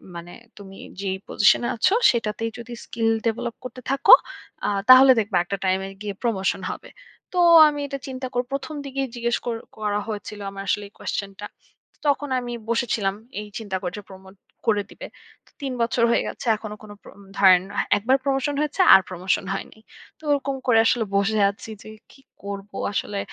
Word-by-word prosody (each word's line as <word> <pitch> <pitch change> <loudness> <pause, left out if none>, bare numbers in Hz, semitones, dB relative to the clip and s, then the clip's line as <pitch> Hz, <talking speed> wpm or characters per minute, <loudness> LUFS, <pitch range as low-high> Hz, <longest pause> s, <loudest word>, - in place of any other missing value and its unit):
মানে 170 +1 -9 0.2
তুমি 195 -1 -12 0.2
যেই 190 -1 -2
পজিশনে 210 +3 +3
আছ 225 - +2 0.2
সেটাতেই 225 -1 -2
যদি 240 0 -9
স্কিল 225 -1 -1 0.2
ডেভেলপ 230 +1 -2
করতে 255 0 -8
থাকো 275 - +6 0.5
আ - - +1 0.2
তাহলে 260 +1 +9
দেখবা 205 -4 0
একটা 200 +3 -4
টাইমে 190 +1 0
গিয়ে 205 -1 -4
প্রমোশন 200 -5 0
হবে। - - -9 0.5
তো - - +2 0.3
আমি 290 -1 -5
এটা 275 0 -5
চিন্তা 260 -1 -5
করব। 245 0 -1
প্রথম 290 +3 -4
দিকেই 275 0 -3
জিজ্ঞেস 235 0 0
কর 235 -2 -2 0.2
করা 210 -1 -1
হয়েছিল 210 -1 -6
আমার 195 0 -8
আসলে 205 - 0
এই - - -44
কোশ্চেন 200 -1 -4
টা। 205 - -6 0.6
তখন 290 0 +1
আমি 240 -1 -6 0.2
বসেছিলাম 220 -4 0 0.3
এই 210 - -9
চিন্তা 200 -4 -4
করে 180 - -3 0.2
প্রমোট 190 0 -14 0.3
করে 210 -2 +3
দিবে। - - -10 0.4
তো - - -26
৩ 270 -2 -3
বছর 230 +1 +1
হয়ে - - +2
গেছে - - -7
এখনো 215 -1 -8
কোনো 210 -1 -11
প্র - - -13 0.3
ধারেন 185 -2 +6
না, - - -10 0.2
একবার 245 +6 +2
প্রমোশন 275 +1 0
হয়েছে 300 +5 0
আর 190 - +8
প্রমোশন 185 +2 -1
হয়নি। 205 - -7 0.4
তো - - -24
ওরকম 275 -1 0
করে 230 -3 +5
আসলে 225 -1 +2
বসে 205 +2 +1
আছি 200 - -12
যে - - -11 0.2
কি 270 - -20 0.2
করব 200 0 -7 0.2
আসলে 200 0 -2
220 Hz, 180 wpm, -23 LUFS, 200-255 Hz, 0.6 s, তাহলে